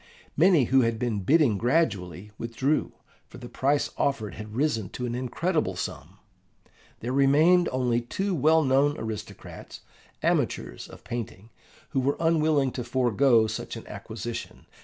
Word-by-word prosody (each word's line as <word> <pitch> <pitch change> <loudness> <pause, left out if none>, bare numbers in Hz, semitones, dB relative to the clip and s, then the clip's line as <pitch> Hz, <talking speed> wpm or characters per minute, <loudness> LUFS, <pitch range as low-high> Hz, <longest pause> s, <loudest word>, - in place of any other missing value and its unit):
Many 170 -2 +5
who 130 +3 +3
had 115 -1 0
been 115 -3 -1
bidding 125 - +3
gradually 105 - 0
withdrew, 130 +6 -1 0.4
for - - -13
the 120 - -9
price 140 +4 0
offered 115 -7 -1
had 105 0 -9
risen 115 -8 0
to 125 - -5
an 120 - -3
incredible 130 - -1
sum. 90 +1 -6 0.8
There 125 +3 -3
remained 155 +6 +4
only 125 -2 0
two 190 +11 -3
well 160 +1 +3
known 140 +2 +2
aristocrats, 110 -2 -8 0.4
amateurs - - -1
of - - -14
painting, 115 -2 -6 0.4
who 140 - -1
were 135 +2 0
unwilling 155 -4 +2
to 125 - -5
forego 120 -1 +3
such 110 - -5
an - - -9
acquisition. - - -7
130 Hz, 140 wpm, -26 LUFS, 115-150 Hz, 0.8 s, Many